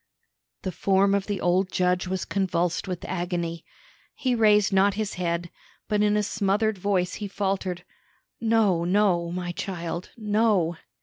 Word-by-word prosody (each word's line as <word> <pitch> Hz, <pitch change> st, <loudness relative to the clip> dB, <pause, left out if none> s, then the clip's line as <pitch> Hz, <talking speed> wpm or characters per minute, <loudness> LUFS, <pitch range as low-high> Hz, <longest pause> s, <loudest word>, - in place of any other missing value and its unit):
The 185 Hz, -, -2 dB
form 195 Hz, +3 st, +2 dB
of 200 Hz, -1 st, 0 dB
the 205 Hz, -2 st, -2 dB
old 185 Hz, +2 st, +1 dB
judge 180 Hz, 0 st, +1 dB
was 185 Hz, 0 st, -2 dB
convulsed 180 Hz, -2 st, -1 dB
with 180 Hz, -2 st, -4 dB
agony. 175 Hz, -2 st, -3 dB, 0.5 s
He 255 Hz, -2 st, 0 dB
raised 210 Hz, -3 st, +4 dB
not 195 Hz, +1 st, +4 dB
his 215 Hz, -1 st, -2 dB
head, 170 Hz, -1 st, -2 dB, 0.4 s
but 210 Hz, -1 st, +1 dB
in 210 Hz, 0 st, +3 dB
a 210 Hz, -, +1 dB
smothered 210 Hz, 0 st, 0 dB
voice 185 Hz, -2 st, 0 dB
he 205 Hz, -, -2 dB
faltered: 190 Hz, -3 st, -2 dB, 0.6 s
"No, 220 Hz, -7 st, +2 dB
no, 180 Hz, -2 st, +2 dB
my 175 Hz, 0 st, -3 dB
child; 175 Hz, -1 st, -5 dB
no!" 210 Hz, -6 st, +2 dB
190 Hz, 145 wpm, -25 LUFS, 175-205 Hz, 0.6 s, raised